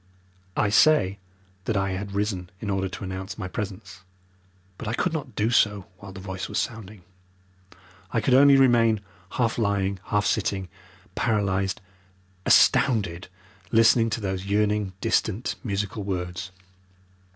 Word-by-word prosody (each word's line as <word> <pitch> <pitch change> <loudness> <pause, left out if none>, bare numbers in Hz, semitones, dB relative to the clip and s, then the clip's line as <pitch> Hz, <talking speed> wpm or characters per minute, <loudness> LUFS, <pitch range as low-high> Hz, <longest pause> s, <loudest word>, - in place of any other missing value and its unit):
I 105 - +2
say 105 -5 +4 0.5
that 110 - 0
I 95 0 0
had 100 +1 -5
risen 100 -3 -2
in 100 0 -3
order 95 -1 -1
to 95 - -8
announce 95 0 -6
my 95 -4 -4
presence, 95 -1 -6 0.8
but - - -6
I 110 - -1
could 175 - 0
not 135 -8 -5
do 110 +2 +1
so 105 -5 +2
while 100 -1 -10
the 95 - -9
voice 95 0 -6
was - - -3
sounding. 105 -4 -4 1.1
I 115 - 0
could 125 +4 +1
only 140 +1 +7
remain 115 -5 +4 0.3
half 120 -2 0
lying, 100 -2 0
half 105 0 0
sitting, 95 -3 -1 0.4
paralysed, 100 -4 0 0.7
astounded, 95 -8 +3 0.4
listening 115 0 +5
to 110 +1 -3
those 95 -1 -3
yearning 105 -1 +1
distant 110 0 0
musical 100 -2 -3
words. 90 -2 -4
100 Hz, 140 wpm, -25 LUFS, 95-115 Hz, 1.1 s, only